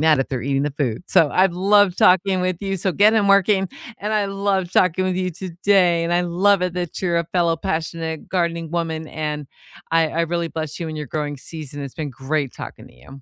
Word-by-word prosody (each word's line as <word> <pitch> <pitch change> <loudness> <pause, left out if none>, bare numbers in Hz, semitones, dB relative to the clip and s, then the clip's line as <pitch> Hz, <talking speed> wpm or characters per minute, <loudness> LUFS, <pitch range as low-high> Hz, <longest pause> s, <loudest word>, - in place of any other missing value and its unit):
that 155 -2 +4
if 135 - -2
they're 130 -4 -3
eating 135 +1 0
the 150 - -1
food. 135 -3 -2
So, 150 - +4
I've 185 -1 +3
loved 195 0 +3
talking 185 +1 +4
with 180 -1 0
you, 195 -1 -2
so 190 +1 -1
get 210 +5 +5
in 205 -3 +2
working, 195 -1 +4 0.3
and 210 +2 -3
I 210 -1 +2
love 195 -2 -1
talking 185 +1 +2
with 185 -1 0
you 185 -1 -1
today, 180 0 +1
and 170 - -1
I 175 - +2
love 180 +2 +2
it 180 -1 -1
that 175 -2 -4
you're 170 -2 +1
a 170 - -2
fellow 170 -2 +2
passionate 160 0 -4
gardening 170 -3 -1
woman, 160 -2 -2
and 150 -2 -4 0.5
I 165 -1 +3
I 165 - -2
really 170 0 -1
bless 155 -2 -5
you 165 - -3
in 155 - -6
your 150 -1 -5
growing 150 +1 -3
season. 145 0 -9
It's 140 -2 -7
been 150 -3 -4
great 135 +2 -2
talking - - -9
to - - -21
you. - - -20
170 Hz, 225 wpm, -21 LUFS, 155-185 Hz, 0.5 s, get